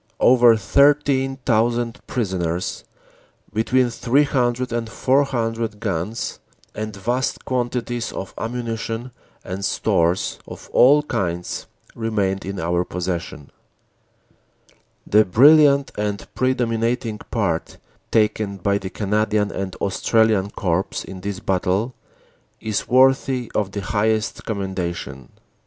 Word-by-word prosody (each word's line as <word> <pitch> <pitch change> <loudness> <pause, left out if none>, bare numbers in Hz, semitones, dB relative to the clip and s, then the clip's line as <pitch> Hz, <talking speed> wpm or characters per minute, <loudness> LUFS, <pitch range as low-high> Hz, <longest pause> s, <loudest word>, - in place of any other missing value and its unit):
Over 120 -2 +6
13,000 130 -2 +2
prisoners, 90 -6 -2 0.7
between 120 +3 +2
300 125 0 +1
and 115 -1 -2
400 115 -5 0
guns, 105 +1 -3 0.3
and 110 -1 -5
vast 120 +7 -2
quantities 120 -1 -2
of 95 - -6
ammunition 115 +1 -4 0.3
and 95 +1 -5
stores 85 -1 +1
of - - -11
all 145 +4 +6
kinds 90 - -3 0.3
remained 105 -4 -1
in 100 0 -4
our 85 +2 0
possession. 85 -5 -5 1.5
"The 105 +1 +5
brilliant 140 - +5
and 105 -1 -3
predominating 115 -3 0
part 95 -8 -1 0.3
taken 105 -2 +1
by 100 +2 0
the 95 - -6
Cana 105 +2 0
dian 105 -1 0
and 95 -1 -4
Australian 105 0 +1
Corps 95 -2 -2
in 95 -1 -9
this 100 0 -4
battle 95 +6 0 0.7
is 110 -2 -2
worthy 130 -1 +3
of 100 -2 -1
the 100 - -4
highest 110 +2 -1
commendation. 90 - -4
110 Hz, 105 wpm, -21 LUFS, 95-125 Hz, 1.5 s, Over